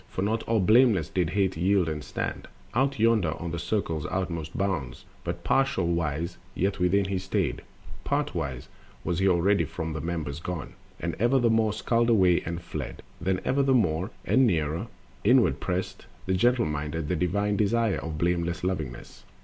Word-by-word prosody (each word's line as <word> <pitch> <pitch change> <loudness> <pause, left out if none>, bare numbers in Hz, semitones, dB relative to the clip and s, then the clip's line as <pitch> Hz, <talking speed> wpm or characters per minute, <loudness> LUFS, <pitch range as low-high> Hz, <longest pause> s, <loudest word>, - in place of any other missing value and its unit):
For 95 - -3
not 110 +2 0
all 115 -1 +2
blameless 105 - +4
did 90 -4 0
Hate 95 0 +1
yield 90 +2 +2
and 75 -2 -3
stand - - -4 0.3
Out 135 +3 +1
yonder 110 -7 +3
on 85 -1 -4
the 85 - -3
circle's 85 -4 -2
utmost 85 -5 -3
bounds; 95 -9 -2 0.2
But 85 0 -4
partwise 85 - 0 0.2
yet 95 +1 0
within 95 +2 +3
he 95 -1 -1
stayed, 95 0 -1 0.4
partwise 85 - -2 0.4
Was 85 -1 -1
he 95 - +3
already 95 +3 +3
from 80 -1 -4
the 80 - -4
members 80 -3 -3
gone. 85 -2 -5 0.3
And 85 -1 -2
ever 120 +5 +3
the 120 -3 +3
more 110 -1 +3
skulked 115 +2 +1
away 95 -6 +4
and 85 +1 -5
fled, - - -6 0.2
Then 90 +1 0
ever 140 - +2
the 135 -1 +3
more, 90 -4 +1 0.2
and 130 -1 +4
nearer, 80 -4 0 0.4
inward - - +4
pressed - - -3 0.2
The 95 - 0
gentle 120 +6 +3
minded, 75 +1 -3
the 90 - 0
divine 100 +5 0
Desire 110 +1 +1
Of 80 -2 -5
blameless 85 +1 0
Lovingness. 80 -10 -4
90 Hz, 170 wpm, -27 LUFS, 85-105 Hz, 0.4 s, blameless